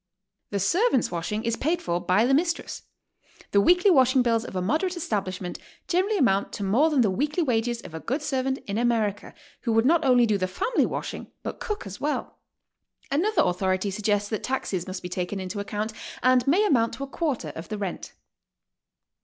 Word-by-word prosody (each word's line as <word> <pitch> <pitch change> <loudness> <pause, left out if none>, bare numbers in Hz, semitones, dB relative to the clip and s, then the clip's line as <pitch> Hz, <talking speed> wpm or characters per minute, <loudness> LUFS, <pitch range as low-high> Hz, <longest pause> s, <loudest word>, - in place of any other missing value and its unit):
The 200 - -2
servants' 335 - +2
washing 180 +6 -3
IS 230 0 +1
paid 330 +5 0
for 175 0 -1
by 205 +5 +3
the 265 - +2
mistress. 335 +4 0 0.7
The 200 - +5
weekly 360 - +5
washing 260 -4 +5
bills 230 -2 +1
of 215 - -8
a - - 0
moderate 320 - 0
establishment 190 - -3 0.3
generally 380 +4 +1
amount 200 - +2
to 205 - -4
more 235 +12 +3
than 290 -5 +3
the 210 -5 +3
weekly 300 - 0
wages 235 -3 0
of 160 - -11
a 160 - -5
good 270 - -3
servant 265 -2 -1
in 205 +2 -2
America, 225 -4 0 0.3
who 235 - -1
would 225 +1 +3
not 325 +3 +4
only 250 -3 +5
do 210 -3 +1
the 185 - 0
family 325 - 0
washing, - - -5 0.2
but - - -5
cook 420 - -4
as 195 0 -8
well." 300 +1 -3 0.7
Another 390 +10 +2
authority 185 +2 0
suggests 205 0 0
that 215 - -2
taxes 195 -9 -2
must 185 0 -6
be - - -3
taken 180 +2 -3
into 190 +2 -5
account 210 +2 -3 0.3
and 255 0 +4
may 370 +9 +4
amount 235 - +2
to 275 - -5
a - - -5
quarter 275 - -2
of 160 +3 -8
the 215 - -3
rent. 195 -3 -5
230 Hz, 195 wpm, -26 LUFS, 200-290 Hz, 0.7 s, The